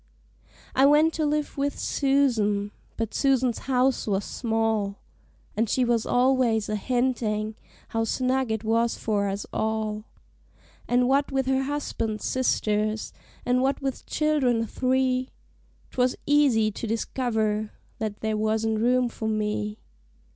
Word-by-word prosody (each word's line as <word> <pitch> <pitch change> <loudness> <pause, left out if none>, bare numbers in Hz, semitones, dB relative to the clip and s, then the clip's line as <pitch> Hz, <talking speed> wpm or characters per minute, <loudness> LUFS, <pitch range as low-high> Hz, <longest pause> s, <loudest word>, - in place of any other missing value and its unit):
I 270 +1 +5
went 305 +3 +5
to 310 -2 0
live 295 -1 -2
with 285 +1 -1
Susan, 230 -8 +1 0.3
but 225 -1 -3
Susan's 260 -4 +2
house 255 -1 +2
was 195 -1 0
small, 220 -4 -1 0.6
And 225 0 0
she 255 +2 +2
was 235 -2 +1
always 245 -4 +2
a 215 - 0
hintin' 220 -2 -1 0.4
how 225 0 0
snug 255 +2 0
it 220 0 -2
was 230 +1 +1
for 205 -2 0
us 200 +1 -4
all; 220 -1 -2 0.8
And 245 0 +3
what 275 +2 +2
with 270 -1 0
her 265 0 +1
husband's 230 -7 -3
sisters, 215 -4 0 0.3
and 250 0 +2
what 270 +1 +1
with 270 -2 -4
child'rn 265 -7 +1
three, 255 +2 0 0.6
'Twas 250 0 +1
easy 270 -7 +3
to 225 - -5
discover 220 -2 -1 0.3
that 215 -2 -4
there 220 -1 -1
wasn't 220 0 0
room 250 +2 +3
for 225 -1 -5
me. 210 -1 -1
235 Hz, 135 wpm, -26 LUFS, 215-260 Hz, 0.8 s, I